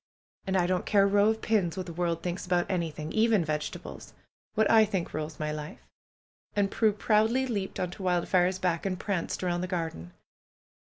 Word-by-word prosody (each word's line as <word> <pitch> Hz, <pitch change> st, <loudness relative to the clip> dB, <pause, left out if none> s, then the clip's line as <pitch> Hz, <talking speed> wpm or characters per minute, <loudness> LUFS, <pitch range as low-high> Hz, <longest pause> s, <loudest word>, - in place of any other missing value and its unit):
And 190 Hz, 0 st, +1 dB
I 175 Hz, -, +3 dB
don't 180 Hz, 0 st, -1 dB
care 200 Hz, -2 st, +4 dB
a -, -, +5 dB
row 205 Hz, +1 st, +4 dB
of 220 Hz, 0 st, -2 dB
pins 195 Hz, -6 st, +1 dB
what 185 Hz, -, -3 dB
the 170 Hz, -, -7 dB
world 170 Hz, -1 st, -1 dB
thinks 180 Hz, +1 st, -3 dB
about 180 Hz, -1 st, +1 dB
anything, 160 Hz, -3 st, -3 dB
even 220 Hz, -5 st, +3 dB
vegetables. 150 Hz, -1 st, -5 dB, 0.4 s
What 220 Hz, -, +3 dB
I 225 Hz, -1 st, +6 dB
think 195 Hz, -5 st, -2 dB
rules 155 Hz, 0 st, -4 dB
my 155 Hz, 0 st, -2 dB
life." 150 Hz, 0 st, -7 dB, 0.7 s
And 200 Hz, -1 st, +1 dB
Prue 220 Hz, -2 st, +3 dB
proudly 220 Hz, +5 st, +2 dB
leaped 205 Hz, -6 st, -3 dB
on 180 Hz, -1 st, -1 dB
to 185 Hz, -, -10 dB
Wildfire's 180 Hz, 0 st, +2 dB
back 180 Hz, -3 st, -1 dB
and 185 Hz, -2 st, -2 dB
pranced 190 Hz, -3 st, -2 dB
around 175 Hz, -1 st, 0 dB
the 185 Hz, -, -2 dB
garden. 160 Hz, -, -4 dB
180 Hz, 190 wpm, -28 LUFS, 170-205 Hz, 0.7 s, I